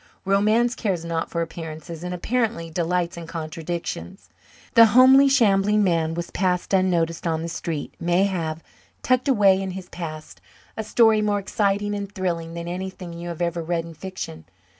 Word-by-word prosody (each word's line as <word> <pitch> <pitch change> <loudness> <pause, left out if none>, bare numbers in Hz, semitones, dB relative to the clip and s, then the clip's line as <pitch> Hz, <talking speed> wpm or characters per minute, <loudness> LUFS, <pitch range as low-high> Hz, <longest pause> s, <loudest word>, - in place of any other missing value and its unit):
Romance 215 +5 +3
cares 190 -9 -2
not 165 -1 -2
for 170 -1 -1
appearances 165 0 -8
and 180 - -4
apparently 210 -2 -1
delights 175 +1 -1
in 170 -1 -7
contradictions. 165 - -5 0.4
The 230 -1 +8
homely 265 +2 +8
shambling 210 -5 +3
man 165 -3 +1
you 170 - -2
pass 180 -1 0
unnoticed 175 -3 +1
on 160 -1 -1
the - - -3
street 165 -2 -4
may 175 +2 +2
have, 165 -5 -2 0.4
tucked 255 +2 +2
away 200 -7 +4
in 190 - -3
his 185 -1 -9
past, 155 -3 -8 0.3
a 220 - -3
story 220 0 +4
more 210 -1 +1
exciting 205 +1 0
and 200 -1 -4
thrilling 170 -4 -3
than 170 0 -5
anything 180 0 -6
you 170 +1 -7
have 170 0 -3
ever 170 0 -1
read 165 0 -2
in 165 - -10
fiction. 160 - -7
180 Hz, 165 wpm, -23 LUFS, 165-205 Hz, 0.4 s, The